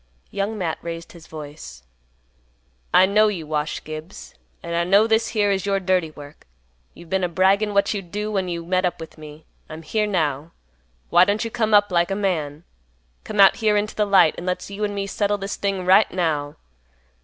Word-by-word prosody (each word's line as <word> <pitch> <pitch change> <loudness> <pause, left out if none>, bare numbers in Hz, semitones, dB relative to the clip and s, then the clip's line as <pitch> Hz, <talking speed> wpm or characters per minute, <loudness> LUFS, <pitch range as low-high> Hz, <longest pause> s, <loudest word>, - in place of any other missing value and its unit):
Young 200 +2 -3
Matt 170 -5 -3
raised 170 0 -7
his 170 -2 -15
voice, 145 - -10 1.1
"I 185 - +6
know 210 +3 +4
you, 185 -7 -3
Wash 150 0 -3
Gibbs, 155 +4 -9 0.3
and 170 0 -4
I 170 - +1
know 200 +5 +4
this 225 0 +2
here 205 -2 +1
is 195 0 -1
your 195 -1 +1
dirty 185 -3 0
work. 145 -1 -14 0.5
You've 170 -1 -14
been 190 -1 0
a 180 - 0
braggin' 195 +4 +2
what 200 - +2
you'd 195 -4 -6
do 210 +1 -3
when 190 -3 -1
you 170 -1 -4
met 185 +1 0
up 180 -1 -1
with 160 -1 -11
me. 155 0 -12 0.2
I'm 160 +1 -9
here 210 +6 -1
now. 155 -5 -2 0.6
Why 175 +1 +7
don't 205 +4 0
you 230 - -5
come 220 -2 +1
up 205 -1 +4
like 175 -1 +2
a 195 - -1
man? 165 -7 -2 0.6
Come 210 -1 -5
out 195 -1 +7
here 215 -2 +2
into 210 +1 -1
the 210 -1 0
light 190 -5 +5
and 175 - -7
let's 180 +2 -3
you 200 +1 -5
and 205 -1 -2
me 200 0 -2
settle 205 +1 -1
this 200 0 -5
thing 195 -2 -2
right 190 +4 +5
now. 155 -5 -2
185 Hz, 205 wpm, -22 LUFS, 165-205 Hz, 1.1 s, Why